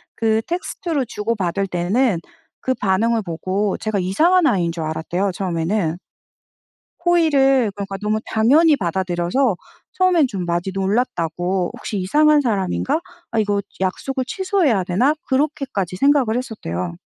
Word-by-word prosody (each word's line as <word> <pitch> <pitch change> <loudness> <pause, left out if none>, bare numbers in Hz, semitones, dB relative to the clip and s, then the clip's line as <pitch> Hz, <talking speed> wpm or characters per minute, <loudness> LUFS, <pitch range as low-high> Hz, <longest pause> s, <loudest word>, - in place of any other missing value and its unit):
그 220 0 +1
텍스트로 335 -4 -2
주고받을 200 -4 -2
때는 185 +3 +1 0.4
그 260 - 0
반응을 220 +2 +1
보고 190 +3 -2
제가 215 -2 -2
이상한 320 - +3
아이인 175 -7 +1
줄 165 -1 -5
알았대요 175 +5 -2
처음에는. 175 -1 -1 1.1
호의를 275 - +3
그러니까 195 -1 -5
너무 215 +1 0
당연히 290 +9 +4
받아들여서 185 - 0 0.4
처음엔 360 -6 +3
좀 190 -7 -4
많이 175 +2 -1
놀랐다고 185 -3 -1
'혹시 205 - -5
이상한 295 +10 +4
사람인가? 230 - 0 0.3
아 225 - 0
이거 205 -1 +1 0.2
약속을 260 +8 -2
취소해야 355 - +1
되나?' 240 - +2
그렇게까지 265 - -1
생각을 270 -3 +3
했었대요. 90 - -4
210 Hz, 330 characters per minute, -20 LUFS, 185-270 Hz, 1.1 s, 당연히